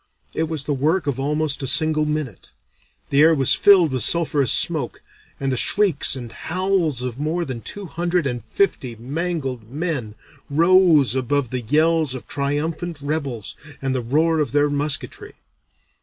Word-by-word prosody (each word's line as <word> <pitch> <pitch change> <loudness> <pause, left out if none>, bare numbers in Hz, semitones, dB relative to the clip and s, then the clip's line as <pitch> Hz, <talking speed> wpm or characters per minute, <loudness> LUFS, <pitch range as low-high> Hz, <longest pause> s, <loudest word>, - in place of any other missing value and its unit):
It 160 0 -2
was 155 -4 -2
the 150 0 -2
work 155 +6 0
of 140 -3 -2
almost 150 +1 -1
a 135 - -3
single 155 +1 +2
minute. 150 -9 -4 0.6
The 140 - +4
air 160 +1 +6
was 135 -3 +4
filled 185 -7 +5
with 130 -4 -1
sulphurous 150 -5 +2
smoke, - - 0 0.4
and 135 -1 -1
the 130 - -1
shrieks 195 - +3
and 120 -3 -8
howls 180 -7 -1
of 125 0 -5
more 165 +4 -1
than 125 -5 -6
two 205 - -7
hundred 175 -1 -1
and 120 -3 -3
fifty 135 - -1
mangled 135 -2 -4
men 140 -7 -3 0.3
rose 165 - +4
above 130 0 -1
the 130 -1 -2
yells 155 +3 +1
of 130 - -9
triumphant 150 +4 -3
rebels 140 -6 -3 0.2
and 135 -1 -2
the 130 - -1
roar 155 +7 +1
of 150 - -1
their 145 0 +2
musketry. 145 0 -2
145 Hz, 160 wpm, -21 LUFS, 130-165 Hz, 0.6 s, air